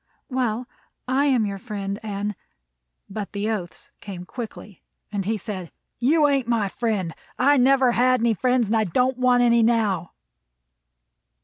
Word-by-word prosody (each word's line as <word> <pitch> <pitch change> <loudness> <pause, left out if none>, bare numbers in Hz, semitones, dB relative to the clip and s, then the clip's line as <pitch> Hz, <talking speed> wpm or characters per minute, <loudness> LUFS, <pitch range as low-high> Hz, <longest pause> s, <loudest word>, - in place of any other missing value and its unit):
"Well, 250 -2 -1 0.4
I 270 +3 +2
am 250 -6 +3
your 200 -1 -4
friend, 200 -2 -4
and 205 -1 -3 0.4
" - - -55 0.3
But 200 0 -6
the 205 +2 -1
oaths 175 -7 -6
came 185 -3 -7
quickly, 210 -3 -8 0.3
and 200 -2 -2
he 220 +2 0
said: 185 -3 -6 0.3
"You 295 +5 +4
ain't 275 -4 +1
my 225 -4 +1
friend. 205 -7 -2 0.2
I 280 +3 +4
never 260 0 +4
had 255 +1 +3
any 230 0 +2
friends, 250 +2 +2
and 215 +2 0
I 220 - +3
don't 250 +8 +1
want 250 -1 +4
any 235 -1 +4
now." 220 -6 +1
225 Hz, 155 wpm, -24 LUFS, 200-250 Hz, 0.4 s, You